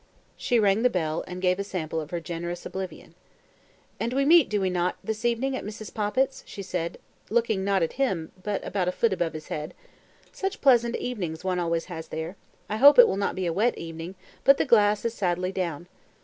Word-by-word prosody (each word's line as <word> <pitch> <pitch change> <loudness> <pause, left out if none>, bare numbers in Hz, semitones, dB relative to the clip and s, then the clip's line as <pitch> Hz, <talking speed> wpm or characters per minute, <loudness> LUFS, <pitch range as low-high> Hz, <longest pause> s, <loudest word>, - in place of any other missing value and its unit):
She 245 - +1
rang 205 0 +3
the 250 - +4
bell, 160 -6 -1
and 180 0 -7
gave 180 +1 +2
a - - 0
sample 165 -5 -3
of 150 - -8
her 175 -1 -3
generous 175 +1 -5
oblivion. 185 -4 -7 0.9
"And 235 +2 -1
we 275 +1 +2
meet, 330 0 +6
do 210 - 0
we 190 -1 0
not, 180 0 0
this 220 +1 -4
evening 245 +3 +1
at - - -4
Mrs. 215 +1 -8
Poppit's?" 220 +6 0
she 200 - -7
said, 175 -2 -3 0.3
looking 220 -4 +1
not 195 -2 +2
at 165 - -2
him, 180 -12 0
but 205 0 -3
about 190 -3 -1
a - - +2
foot 225 +2 +1
above 175 -3 -1
his 155 -1 -8
head. 155 +3 -5 0.6
"Such 400 -5 -3
pleasant 240 -3 +4
evenings 180 -10 -4
one 185 -1 0
always 170 -1 -1
has 165 -3 -7
there, 160 +4 -5 0.3
I 215 - -2
hope 285 +5 +8
it - - +10
will - - 0
not 200 - -1
be 185 - -2
a 170 - 0
wet 220 +7 +1
evening, 165 +2 -7 0.3
but 275 0 +6
the - - +1
glass 210 -4 +4
is 230 - 0
sadly 185 -2 -1
down. 175 -3 -3
190 Hz, 215 wpm, -26 LUFS, 175-230 Hz, 0.9 s, it